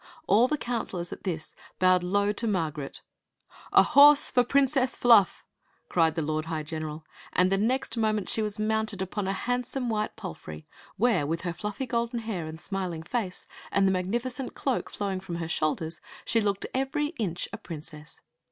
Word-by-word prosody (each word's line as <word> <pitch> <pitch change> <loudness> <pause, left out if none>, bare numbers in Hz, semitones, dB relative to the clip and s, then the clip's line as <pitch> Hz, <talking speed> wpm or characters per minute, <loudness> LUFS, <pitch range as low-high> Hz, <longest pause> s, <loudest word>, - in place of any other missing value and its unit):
All 230 +1 +5
the 300 - 0
coun 240 -4 -2
selors, 175 -2 -5
at - - -12
this, 165 -4 -4 0.2
bowed 185 -1 +4
low 200 +3 +2
to 230 +3 -2
Margaret 160 -8 -2 0.4
" - - -47 0.3
A - - +7
horse 290 0 +7
for 250 - +5
the 245 - -3
Princess 270 -1 +2
Fluff! 230 -5 +5 0.2
" - - -40
cried 165 -2 +3
the 165 - 0
lord 155 +1 -1
high 160 -2 -3
general; 155 0 -5 0.3
and 180 +2 +3
the 195 - +3
next 255 +6 0
moment 215 -4 +1
she 220 - 0
was 210 -1 -2
mounted 220 -1 -1
upon 190 +1 -3
a 195 - 0
handsome 245 +3 -2
white 215 -1 -1
palfrey, 170 - -8 0.3
where, 205 -9 +2
with 165 +2 -1
her 175 -1 -3
fluffy 210 +8 -4
golden 235 0 -1
hair 195 -8 -4
and 160 0 -8
smiling 180 -4 -4
face 190 0 -3 0.3
and 195 0 +3
the - - +3
magnificent 240 +8 -2
cloak 265 -3 -1
flowing 195 -2 -3
from 185 -2 -6
her 170 -1 -3
shoul 155 -2 +1
ders, 160 +1 -7 0.2
she 230 - +2
looked 200 -2 0
every 280 +3 0
inch 180 -6 -2
a - - -3
prin 160 -4 -7
cess. 155 0 -12
200 Hz, 195 wpm, -28 LUFS, 170-235 Hz, 0.4 s, A